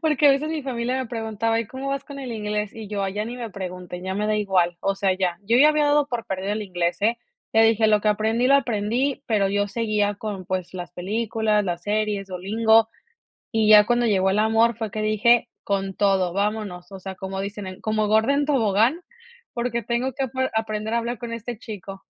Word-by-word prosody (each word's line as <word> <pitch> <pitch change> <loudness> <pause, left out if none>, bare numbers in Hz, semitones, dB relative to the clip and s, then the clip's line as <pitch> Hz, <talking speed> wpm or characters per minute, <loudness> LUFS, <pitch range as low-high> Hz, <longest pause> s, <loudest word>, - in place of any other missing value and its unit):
Porque 300 -3 +3
a - - +8
veces 275 +3 +1
mi 315 -2 -3
familia 250 -1 -2
me 260 -1 -2
preguntaba: 225 -1 -1
"¿Y 230 - -5
cómo 265 +5 -6
vas 275 0 -2
con 280 -2 -9
el 260 -3 -5
inglés?", 210 -1 -3
y 220 -2 -8
yo: 205 -1 -2
"Ay 195 0 -2
ya 210 +1 -1
ni 240 +2 -6
me 235 -3 -6
pregunten, 180 -2 -7
ya 190 0 -3
me 210 +2 -1
da 215 - +1
igual, 185 -4 +1
o 195 - 0
sea, 195 -1 +1
ya". 185 -2 -1
Yo 225 +4 +2
ya 290 +4 +7
había 305 -1 +2
dado 290 0 +3
por 240 -3 -4
perdido 190 +1 -2
el 215 0 -2
inglés, 175 -3 -2
eh, 230 +3 +2 0.3
le 225 0 +5
dije: 225 0 +4
"Lo 210 -1 +4
que 215 - +1
aprendí, 220 +3 +1
lo 275 - +5
aprendí", 250 +2 0
pero 205 -4 +2
yo 205 +1 0
seguía 210 -1 0
con, 200 -3 -6
pues, 185 -1 -3
las 175 -1 -6
películas, 215 +3 0
las 175 -2 -3
series, 210 0 -1
Duolingo, 220 +5 +3 0.6
y 220 -2 +2
ya 210 -1 +8
cuando 240 0 +2
llegó 190 -3 +2
el 195 - +1
amor 225 +1 +3
fue 220 -2 -4
que 215 +2 -3
dije: 215 +3 +3
"Con 195 -1 -2
todo, 190 -3 +2
¡vámonos!, 200 -2 -3
o 195 - -8
sea, 190 0 -7
como 190 0 -5
dicen 200 0 -5
en: 185 0 -8
"Como 215 -1 0
gorda 220 +5 +3
en 285 0 +1
tobogán", 240 - +2 0.5
porque 235 -1 -2
tengo 240 +4 -1
que 270 - -1
ape 260 +1 -2
aprender 220 0 -2
a - - +3
hablar 235 0 -3
con 235 +1 -6
este 230 0 -6
chico. 195 -4 -8
215 Hz, 225 wpm, -23 LUFS, 195-235 Hz, 0.6 s, a